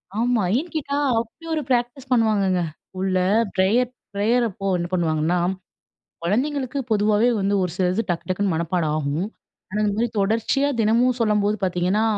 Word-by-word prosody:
ஆமா 235 0 +2 0.2
ஏன்னு 330 +5 -3
கேட்டா, 285 -2 -1 0.2
அப்டி 230 +9 -8
ஒரு 310 - 0
பிராக்டிஸ் 245 +1 -1
பண்ணுவாங்கங்க, 210 -6 +2 0.3
ஸ்கூல்ல 185 0 -1 0.4
ப்ரேயர் 225 +7 +3 0.2
ப்ரேயர் 225 +5 +2
அப்போ 195 +1 -5
என்ன 175 - -2
பண்ணுவாங்கன்னா, 165 0 +1 0.8
குழந்தைகளுக்கு 260 - -1
பொதுவாவே 210 +2 +3
வந்து 195 +1 0
ஒரு 180 - -2
சிலது 185 +3 +1
டக்கு 175 +1 -2
டக்குன்னு 190 0 0
மனப்பாடம் 165 -1 0
ஆகும். 150 +5 -1 0.4
ஆனா, 210 - -2
இந்த 205 - +1
மாரி 235 - +2
தொடர்ச்சியா 225 +7 +1
தினமும் 235 +3 +3
சொல்லும்போது 210 -1 +2
பாத்தீங்கன்னா, 185 +3 +1
210 Hz, 145 wpm, -23 LUFS, 185-240 Hz, 0.8 s, ப்ரேயர்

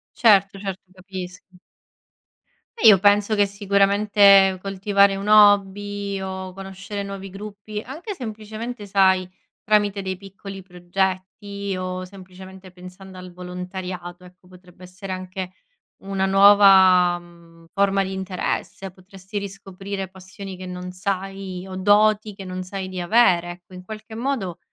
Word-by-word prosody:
Certo, 200 -4 +4
certo 195 -2 -5
capisco. 185 -1 -10 1.2
E 450 - +5
io 200 -3 +8
penso 205 +2 +3
che 205 -1 +4
sicuramente 200 -1 +4
coltivare 200 0 +2
un 200 +2 -5
hobby, 205 -1 +3
o 190 -1 -6
conoscere 195 +2 -7
nuovi 195 -1 -7
gruppi, 210 +1 -8
anche 315 - -7
semplicemente 220 - -7
sai 190 -2 +3 0.3
tramite 205 -1 +1
dei 190 -1 -4
piccoli 195 0 -10
progetti 190 +2 -4
o 185 0 -4
semplicemente 190 0 -13
pensando 185 +1 -12
al 180 -1 -10
volontariato, 180 0 -7
ecco 180 0 -18
potrebbe 180 0 -18
essere 185 +2 -8
anche 185 0 -6 0.5
una 195 0 -1
nuova, 190 -2 +6
mhmm, 170 -1 -19
forma 195 -1 +2
di 190 0 -4
interesse. 190 0 -4
Potresti 190 +2 -9
riscoprire 195 0 -7
passioni 190 +1 -10
che 185 0 -9
non 180 0 -7
sai 195 -1 -4
o 185 - -7
doti 210 +2 +3
che 195 -1 -10
non 185 0 -6
sai 190 0 -6
di 185 -1 -6
avere, 175 -3 +3
ecco 180 +1 -16
in 180 0 -10
qualche 220 +2 -9
modo 225 -9 -3
195 Hz, 130 wpm, -22 LUFS, 185-200 Hz, 1.2 s, io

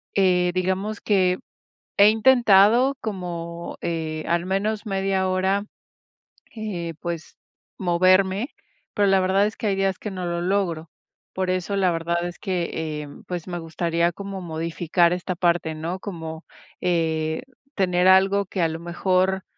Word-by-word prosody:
eh, 180 -2 +3
digamos 190 +3 -1
que 185 -3 +2 0.6
he 200 +1 +7
intentado 235 +2 +5
como, 170 -5 -5
eh, 160 -2 -3
al 170 0 +1
menos 205 +3 -1
media 195 -1 0
hora, 190 +2 +1 0.9
eh, 180 -7 -4
pues, 170 -2 -6 0.4
moverme, 185 +5 +3 0.5
pero 205 -1 +3
la 195 0 +4
verdad 190 +2 +3
es 215 - -3
que 215 - -3
hay 195 - +1
días 195 -1 0
que 210 - -5
no 185 -1 -4
lo 170 0 -2
logro. 175 -4 -1 0.4
Por 185 -1 -1
eso, 185 +2 -2
la 190 -2 +2
verdad 170 +1 -1
es 175 - -8
que, 180 -4 -2
eh, 155 -2 -4 0.2
pues, 175 -2 -5
me 175 -1 -4
gustaría 170 +1 0
como 195 +1 -7
modificar 170 +1 0
esta 180 0 -3
parte, 170 -2 +1
¿no? 170 +4 -4
Como, 160 -5 -7 0.4
eh, 160 -2 0 0.3
tener 180 -2 +2
algo 195 +1 +5
que, 185 -1 -3
a 165 - +3
lo 160 0 -5
mejor, 185 +2 0
185 Hz, 145 wpm, -23 LUFS, 170-195 Hz, 0.9 s, he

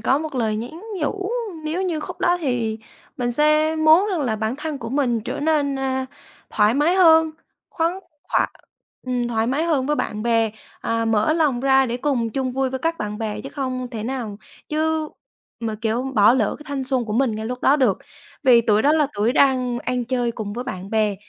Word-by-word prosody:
có 265 +5 +2
một 310 -2 -5
lời 220 -4 0
nhắn 250 +10 -6 0.2
nhủ 385 +7 -2 0.3
nếu 335 +5 -1
như 340 -4 -1
khúc - - -8
đó 350 0 +3
thì 235 -6 -1 0.4
mình 240 -1 -1
sẽ 305 +3 +3
muốn 315 +5 +5
rằng 350 -5 -1
là 230 -5 0
bản 220 +4 -2
thân 300 -1 -4
của 230 -1 -6
mình 245 -4 0
trở - - -4
nên, 290 -3 +1
ơ, 265 -1 -1 0.5
thoải 210 +2 +3
mái 305 +6 +3
hơn, 320 -3 +6 0.4
khoáng 335 +3 -1 0.3
khỏa - - +2 0.6
ừm, 245 -1 -1
thoải 225 -1 0
mái 280 +6 0
hơn 290 -6 +1
với 295 0 +1
bạn 215 0 -3
bè. 230 -2 +2 0.3
À, 230 0 -1
mở 225 +5 +2
lòng 300 -7 +1
ra 265 0 +4
để 240 +1 -2
cùng 245 -4 -1
chung 260 +1 -2
vui 265 0 0
với 265 - -3
các 330 +4 -1
bạn 210 0 -4
bè 215 -2 -3
chứ 270 - -7
không 255 -3 -4
thể 220 -3 -5
nào 230 -4 -4 0.3
chứ 315 0 0 0.5
mà, 225 -2 -2
kiểu, 230 +2 0
bỏ 215 +2 +6
lỡ 220 -6 0
cái 300 - -13
thanh 275 -2 -3
xuân 255 -2 0
của 210 - -5
mình 235 -1 +1
ngay 220 +1 -4
lúc 250 +1 -5
đó 285 - +5
được. 245 -9 +2 0.4
Vì 250 -4 +6
tuổi 215 -1 +2
đó 295 - +4
là 310 -2 +3
tuổi 210 +4 +1
đang 255 -3 +2
ăn 250 0 -2
chơi 245 -1 -1
cùng 205 -2 -5
với 245 +3 -5
bạn 185 -4 -6
bè, 215 -2 +1
255 Hz, 215 wpm, -22 LUFS, 230-300 Hz, 0.6 s, hơn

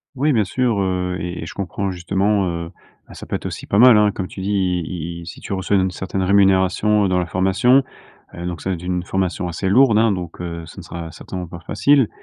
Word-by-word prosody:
Oui 145 +3 +2
bien 110 -4 +3
sûr, 120 +1 0
heu, 90 -1 -1
et 90 0 -5
et - - -6
je 85 - -8
comprends 100 0 -3
justement, 95 +2 0
heu, 85 0 -5 0.4
bah, - - -13
ça - - -10
peut - - -2
être - - -6
aussi - - -6
pas 100 - +1
mal 125 +1 +8
hein, 105 -1 +4
comme 95 -2 -4
tu 95 - -9
dis, 100 +2 -2 0.3
i 85 0 -6
i - - -10
si - - -8
tu - - -6
reçois 95 +1 0
une 95 -1 +2
certaine 95 +1 -3
rémunération 100 +2 +3
dans 90 -1 +1
la 90 - -2
formation. 95 +10 +3 0.5
Heu, 85 - -7
donc 85 -3 -5
ça 95 - -2
va - - 0
être 85 - -10
une 90 0 -2
formation 95 -1 -2
assez 85 +3 -2
lourde 115 0 +5
hein, 115 -1 +4
donc 90 -3 -5
heu, 85 -1 -5
ce - - -12
ne - - -9
sera 85 -1 -7
certainement 90 +2 -7
pas 85 - -9
facile. 135 - +2
95 Hz, 245 wpm, -20 LUFS, 90-100 Hz, 0.5 s, mal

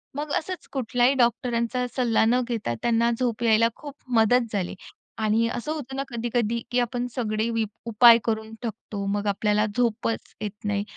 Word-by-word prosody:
मग 295 +1 -4
असंच 370 +3 -5
कुठल्याही 245 0 +2
डॉक्टरांचा 240 0 +1
सल्ला 235 -4 +2
न 240 +3 +3
घेता 225 - -2
त्यांना 235 0 +2
झोप 240 -2 -1
यायला 230 0 +5
खूप 290 -2 -9 0.2
मदत 230 +2 +4
झाली. 195 -3 -2 0.4
आणि 220 +1 +2
असं 245 +6 -4
होतं 270 -4 -5
ना 275 - -1
कधी-कधी 235 -1 -1
की 245 - +2
आपण 245 0 -1
सगळे 220 -2 -1
वीप 225 -2 -1 0.2
उपाय 230 +1 +8
करून 220 -1 -2
टाकतो 210 -3 -5
मग 205 0 -2
आपल्याला 210 +1 +1
झोपच 230 -1 -1
येत 210 0 -6
नाही. 205 -1 0
230 Hz, 165 wpm, -25 LUFS, 220-245 Hz, 0.4 s, उपाय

